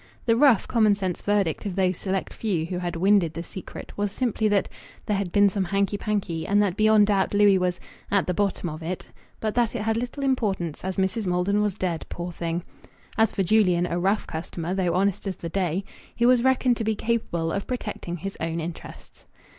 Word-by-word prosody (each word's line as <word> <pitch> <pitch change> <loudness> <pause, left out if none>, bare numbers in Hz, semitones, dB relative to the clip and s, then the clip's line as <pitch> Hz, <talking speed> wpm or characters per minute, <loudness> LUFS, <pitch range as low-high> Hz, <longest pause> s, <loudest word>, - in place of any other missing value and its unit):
The 230 -2 +4
rough, 255 -4 +5
commonsense 205 -6 +1
verdict 205 -3 0
of 190 - -4
those 185 -1 +2
select 190 +1 -3
few 185 -8 -1
who 180 +1 -4
had 175 -1 -3
winded 180 -2 +3
the 165 - -4
secret 185 +2 -9
was 205 -1 -1
simply 225 -2 0
that 205 -2 +2 0.4
"there 210 - 0
had 195 -3 -2
been 205 +2 +5
some 195 -1 0
hanky 200 +2 0
panky," 200 -6 -2
and 205 +1 +3
that 190 -3 0
beyond 215 0 +5
doubt 200 -1 +1
Louis 205 -2 +5
was 180 -1 -1 0.3
"at 200 -1 +2
the 180 - -1
bottom 195 -1 -1
of 155 0 -6
it," 175 +3 -4 0.3
but 215 -1 -1
that 240 -1 +1
it 220 - -2
had 225 0 +1
little 245 +4 -4
importance, 200 - -1
as 190 0 -3
Mrs. 190 +2 0
Maldon 180 +3 +1
was 205 -3 0
dead, 175 -4 -3
poor 175 0 -5
thing. 170 0 -3 0.5
As 220 -1 +3
for 195 - 0
Julian, 185 -3 +3
"a 175 0 -2
rough 195 +4 +1
customer, 165 +1 -4
though 180 -3 0
honest 195 +1 0
as 190 - -2
the 170 - -6
day," 185 +1 -1 0.3
he 235 - +2
was 250 -1 +5
reckoned 255 -2 +3
to 225 - -2
be 220 0 0
capable 205 -8 -1
of 200 - -3
protecting 210 -8 -4
his 195 +4 -6
own 165 +1 -2
interests. 165 +1 -9
195 Hz, 210 wpm, -25 LUFS, 175-215 Hz, 0.5 s, rough